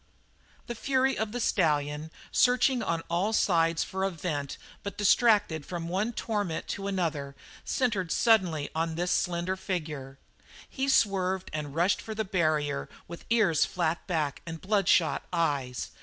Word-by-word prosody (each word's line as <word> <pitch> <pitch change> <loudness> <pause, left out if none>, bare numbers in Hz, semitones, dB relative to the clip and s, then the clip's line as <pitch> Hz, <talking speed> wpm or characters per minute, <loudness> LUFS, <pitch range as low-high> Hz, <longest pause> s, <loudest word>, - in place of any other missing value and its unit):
The 240 - -4
fury 265 +3 +1
of 220 -1 -2
the 245 - -3
stallion, 150 -7 +1 0.2
searching 250 0 +3
on 165 0 -1
all 185 +6 0
sides 165 -5 +2
for 190 0 -4
a 195 - +2
vent 150 -5 -4 0.2
but 200 - -6
distracted 205 - +3
from 170 +1 -5
one 195 +7 -1
torment 205 -7 -2
to 200 0 -3
another, 160 -8 -2 0.3
centred 205 -10 0
suddenly 180 -10 +2
on 165 0 -1
this 175 +2 -1
slender 180 +1 0
figure. 155 -8 -5 0.5
He 270 0 -2
swerved 190 -6 +2
and 150 -2 -4
rushed 175 +4 +2
for 220 - -6
the 220 0 -1
barrier 155 -7 0 0.2
with 170 0 -9
ears 210 -10 +3
flat 170 -2 -1
back 155 -6 -1
and 165 -1 -5
bloodshot 190 -4 +2
eyes. 145 -7 -1
175 Hz, 145 wpm, -28 LUFS, 160-205 Hz, 0.5 s, searching